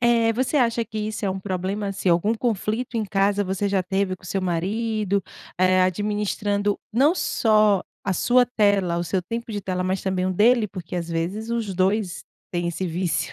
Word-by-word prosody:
Eh, 235 -1 +3
você 260 +6 0
acha 235 -3 +2
que 220 0 -6
isso 215 0 -3
é 195 - +1
um 190 - -3
problema, 190 +2 -3
assim, 195 -1 -2
algum 175 +6 +3
conflito 230 +1 -2
em 220 - 0
casa, 200 0 +1
você 190 +2 -1
já 195 -2 +1
teve 190 0 -1
com - - -21
o - - -9
seu 190 +1 -2
marido, 200 +3 -1 0.4
eh, 185 0 +4
administrando, 205 +1 0
não 280 +8 +4
só 215 - +3 0.2
a 195 - 0
sua 245 +7 +4
tela, 200 -7 +2
o 175 - -1
seu 185 +1 -1
tempo 230 +3 -5
de 205 - -3
tela, 185 -1 -2
mas 185 +1 -1
também 185 -1 0
o 185 - 0
dele? 225 +3 +4
Porque 180 -3 -7
às 170 -1 -3
vezes 180 +7 -3
os 230 -4 -2
2 190 +1 0 0.3
têm 175 -1 -1
esse 170 +2 -3
vício. 175 +1 -1
200 Hz, 200 wpm, -23 LUFS, 185-220 Hz, 0.4 s, eh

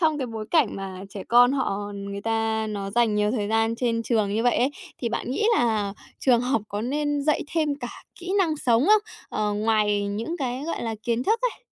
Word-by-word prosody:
trong 315 -3 +2
cái 260 - -2
bối 225 -2 -5
cảnh 330 - +3
mà 190 -1 -6
trẻ 195 -1 -6
con 245 +2 +6
họ 205 -6 -2
người 200 0 -5
ta 225 0 0
nó 200 -2 -4
dành 230 -1 +2
nhiều 210 0 +2
thời 210 -4 -1
gian 225 +1 +2
trên 230 -2 0
trường 215 -4 +1
như 225 - +1
vậy 245 0 +3
ấy, 260 +3 +2 0.3
thì 235 - -1
bạn 240 - -3
nghĩ 430 +12 +1
là 215 - +1 0.3
trường 245 -3 +4
học 250 -3 0
có 205 - -3
nên 290 +4 -1
dạy 305 +1 +2
thêm 315 -2 +2
cả 245 - -4 0.3
kỹ 360 +2 -4
năng 330 -5 +2
sống 245 -1 +2
không? 425 0 +6 0.3
Ờ, 210 -1 -1
ngoài 210 -1 +2
những 225 +12 -3
cái, 255 -1 -2
gọi 335 - -3
là, 225 -1 -2
kiến 235 0 0
thức 445 +2 +2
ấy. - - -2
230 Hz, 225 wpm, -25 LUFS, 210-270 Hz, 0.3 s, con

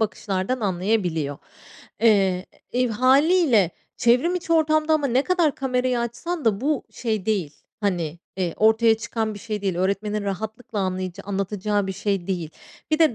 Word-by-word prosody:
bakışlardan 210 +2 -1
anlayabiliyor. 180 -7 0 0.6
Eee, 195 -5 +3 0.3
e, 250 +1 +2
hâliyle 260 - +4 0.3
çevrimiçi 330 +9 +2
ortamda 310 -1 +3
ama 290 -2 +1
ne 255 +2 +2
kadar 350 -5 +2
kamerayı 255 -2 0
açsan 240 +8 -4
da 215 -1 +2
bu 295 +1 0
şey 220 -5 -3
değil, 190 -9 -1 0.3
hani, 175 -6 -1 0.2
eee, 180 -3 -1
ortaya 220 +1 +4
çıkan 220 -1 -3
bir - - -8
şey 210 -1 -5
değil. 190 -3 -1
Öğretmenin 200 +3 -1
rahatlıkla 215 +3 -4
anlayaca 185 -2 -3
anlatacağı 200 +1 -1
bir 190 - -2
şey 195 -2 -2
değil. 175 -5 -3 0.4
Bir 310 - +2
de 315 -7 +4
215 Hz, 145 wpm, -23 LUFS, 190-255 Hz, 0.6 s, hâliyle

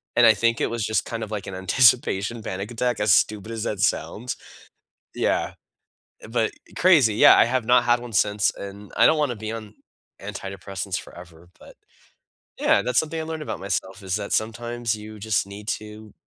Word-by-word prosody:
and - - +6
I - - +8
think 115 0 +1
it - - +1
was 115 -1 -3
just 110 +1 0
kind 115 -1 -4
of 110 - -7
like 105 -2 -4
an 95 - -6
anticipation 115 +1 +2
panic 95 +2 -5
attack, 120 +1 -1
as 105 -1 +2
stupid 105 +1 +1
as 110 -1 -4
that 105 - -3
sounds. 115 +3 -1 0.8
Yeah, - - 0 0.8
but 115 -1 0 0.2
crazy, 155 - +5
yeah, - - +8
I - - +6
have 125 0 0
not 125 +1 +5
had 120 0 +3
1 120 -1 -9
since, 105 0 +2
and 100 +1 -9
I - - +6
don't 160 - +4
wanna 145 -5 0
be 110 0 -5
on 110 -2 -7 0.5
antidepressants 100 -1 -5
forever, 85 -1 -14
but, - - -15 0.9
yeah, - - +3
that's 125 +2 +2
something 160 +1 -3
I - - -3
learned 160 0 -5
about - - -5
myself, 95 +1 -4
is 95 -1 -2
that 100 -1 -6
sometimes 120 +1 -1
you 110 0 -10
just 105 -1 0
need 100 +1 -10
to 105 0 -6
110 Hz, 190 wpm, -24 LUFS, 100-120 Hz, 0.9 s, I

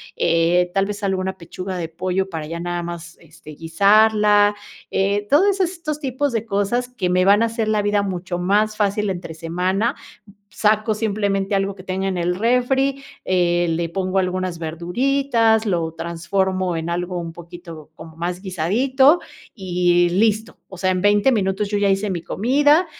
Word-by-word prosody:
eh, 170 +2 +2
tal 195 0 +2
vez 205 0 -6
alguna 190 -1 -1
pechuga 185 +2 -6
de 165 -2 -4
pollo 185 +3 -2
para 160 -3 -5
ya 170 +1 -5
nada 175 0 -3
más, 170 0 -8
este, 160 -1 -15
guisarla, 205 +5 +3 0.4
eh, 200 +2 0
todo 365 +8 +5
eso 385 -1 +1
estos 330 -4 -4
tipos 275 0 -2
de 225 -1 -2
cosas 220 +4 -1
que 205 -8 -3
me 185 +1 +2
van 205 +3 +5
a - - +4
hacer 225 -1 -2
la 215 -1 +1
vida 205 0 +1
mucho 180 -2 -4
más 210 +4 +1
fácil 205 0 0
entre 175 -3 -5
semana. 180 +7 -1 0.6
Saco 215 0 +1
simplemente 200 -2 -1
algo 195 0 0
que 185 - -12
tenga 190 +1 -2
en 185 - -2
el 175 +1 0
refri, 265 +5 +1 0.2
eh, 175 -1 +1
le 165 0 -1
pongo 190 +1 -1
algunas 185 -1 -2
verduritas, 225 - +1
lo 165 -4 -1
transformo 180 +2 -2
en 165 +1 -4
algo 175 +1 -3
un 165 -1 -6
poquito 170 -3 -11
como 160 -1 -12
más 175 +2 -3
guisadito 255 - +2 0.3
y 175 -3 +1
listo. 215 +4 0
O 190 - -11
sea, 185 0 +1
en 185 0 -1
20 205 +5 +4
minutos 200 -1 0
yo 205 - -1
ya 200 -1 +2
hice 195 +1 0
mi 170 -3 -3
comida, 290 - +2
195 Hz, 170 wpm, -21 LUFS, 175-215 Hz, 0.6 s, todo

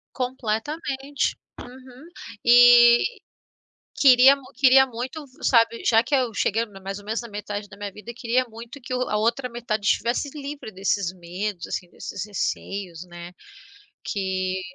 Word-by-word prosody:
Completamente. 265 +3 -3 0.2
Uhum. 255 +3 -13 0.4
E 240 0 +8 1.0
queria 265 0 +7
mu 275 - -15
queria 265 +1 +6
muito, 255 +5 -6 0.2
sabe, 230 -1 +3
já 225 -1 +4
que 250 - -2
eu 255 -4 +1
cheguei 225 +3 0
mais 195 -1 -8
ou 205 - -14
menos 220 +2 -2
na 235 - -9
metade 205 0 -6
da 195 - -13
minha 205 0 -6
vida, 210 +4 -10
eu - - -9
queria 240 +2 0
muito 230 +5 -11
que 255 - -7
a 250 -4 -1
outra 235 +4 0
metade 225 -3 -4
estivesse 235 +7 +1
livre 285 -5 -7
desses 190 -1 -1
medos 180 +1 -5
assim 180 - -5
desses 200 - -7
receios, 195 -3 -4
né. 175 0 -10 0.7
Que 190 -2 -2
230 Hz, 145 wpm, -24 LUFS, 200-255 Hz, 1.0 s, E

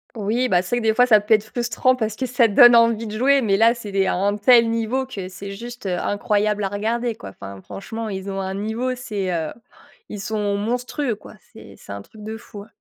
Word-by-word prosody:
Oui, 230 +4 0
bah, 180 - +4
c'est 185 +7 -2
vrai 240 - -1
que 225 - 0
des 220 - +3
fois 245 +2 +5
ça 215 -4 +6
peut 210 +2 -2
être 215 -1 +5
frustrant 240 +3 0
parce 220 -3 -2
que 260 - -2
ça 245 -1 +3
donne 240 +3 +7
envie 230 -1 +3
de 215 0 -6
jouer, 275 +4 +4
mais, 205 -6 +2
là, 225 +3 +4
c'est 220 -4 -8
des 195 0 +2
à - - +1
un 200 +3 0
tel 230 +2 +5
niveau 230 +3 -1
que 195 -8 -7
c'est 195 +1 -8
juste, 235 +2 -8
heu, 180 -2 -1
incroyable 210 +1 0
à - - 0
regarder 225 +4 -2
quoi, 100 - -10
enfin, 95 0 -10
franchement 220 - -6
ils 195 0 -5
ont 195 - -4
un 190 0 -3
niveau, 220 +6 -2
c'est, 210 -7 -4
heu, 160 -3 -2 0.6
ils 210 - -6
sont 205 0 -2
monstrueux 245 +4 -2
quoi, 205 - -14 0.2
c'est - - -13
c'est - - -11
un 100 0 -6
truc 215 - -16
de 220 +1 -6
fou, 210 -3 -11
heu. - - -20
215 Hz, 250 wpm, -21 LUFS, 200-235 Hz, 0.6 s, donne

